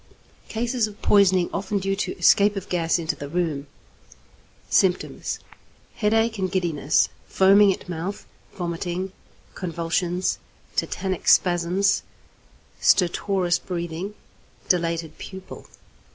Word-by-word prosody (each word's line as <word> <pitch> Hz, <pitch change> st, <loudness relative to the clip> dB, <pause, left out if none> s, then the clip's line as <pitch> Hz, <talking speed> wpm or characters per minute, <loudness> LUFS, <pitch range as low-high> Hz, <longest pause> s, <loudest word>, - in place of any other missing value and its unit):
Cases 235 Hz, 0 st, 0 dB
of 210 Hz, -1 st, -12 dB
poisoning 190 Hz, -3 st, +4 dB
often 200 Hz, +1 st, -1 dB
due 195 Hz, 0 st, -1 dB
to -, -, -3 dB
escape 205 Hz, +1 st, +5 dB
of 195 Hz, -1 st, -6 dB
gas 170 Hz, -2 st, +1 dB
into 160 Hz, -2 st, -2 dB
the 145 Hz, -1 st, -7 dB
room. 155 Hz, -4 st, -2 dB, 1.0 s
Symptoms. 185 Hz, -2 st, +1 dB, 0.6 s
Headache 225 Hz, 0 st, +1 dB
and 185 Hz, -1 st, -1 dB
giddiness, 165 Hz, -6 st, +1 dB, 0.2 s
foaming 195 Hz, +1 st, +5 dB
at 190 Hz, -, -6 dB
mouth, 180 Hz, +3 st, -5 dB, 0.3 s
vomiting, 175 Hz, +1 st, -3 dB, 0.4 s
convulsions, 175 Hz, +1 st, -1 dB, 0.4 s
tetanic 190 Hz, -2 st, -2 dB
spasms, 180 Hz, +2 st, +3 dB, 0.8 s
stertorous 180 Hz, -1 st, +2 dB
breathing, 175 Hz, +2 st, -5 dB, 0.5 s
dilated 165 Hz, -2 st, 0 dB
pupil. 190 Hz, -1 st, -9 dB
185 Hz, 100 wpm, -24 LUFS, 170-200 Hz, 1.0 s, escape